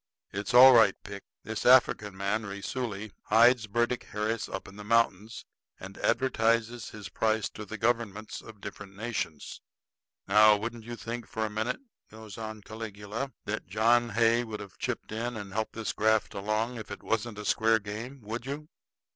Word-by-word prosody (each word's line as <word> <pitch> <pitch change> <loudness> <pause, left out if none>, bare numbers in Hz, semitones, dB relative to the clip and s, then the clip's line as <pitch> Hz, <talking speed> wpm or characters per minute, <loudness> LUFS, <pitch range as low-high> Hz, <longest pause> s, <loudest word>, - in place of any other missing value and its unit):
It's 105 +6 -3
all 130 +1 +11
right, 110 -5 +6
Pick. 100 0 -8 0.2
This 110 +1 -4
African 110 -6 +4
man 100 +3 0
Raisuli 100 +1 -4
hides 120 0 +5
Burdick 120 +4 0
Harris 110 +1 -2
up 95 - -6
in 95 - -12
the 105 - -9
mountains, 110 -1 +1 0.3
and 95 +1 -9
advertises 115 -2 +1
his 105 -3 -8
price 110 +1 0
to 105 - -9
the 110 +2 -7
governments 110 -2 -1
of 110 -2 -13
different 100 -2 -9
nations. 105 -8 -4 0.7
Now, 105 +2 +7
you 105 - -5
wouldn't 115 0 -6
think 115 -1 -5
for 110 0 -2
a 105 - -4
minute," 110 - -2 0.3
goes 110 -2 -11
on 110 -1 -6
Caligula, 110 +4 -6
"that 110 +1 -4
John 115 +4 +3
Hay 115 +2 +3
would 110 -2 -6
have 100 -2 -11
chipped - - -3
in 115 +2 -3
and 100 -2 -7
helped 110 +1 -2
this 115 -1 -3
graft 110 0 +2
along 110 +4 -1
if 110 - -9
it 100 - -8
wasn't 115 -1 -1
a 105 - -6
square 110 +2 +3
game, 110 +6 -7
would 115 +4 -5
you?" 150 +2 -5
110 Hz, 170 wpm, -29 LUFS, 105-115 Hz, 0.7 s, all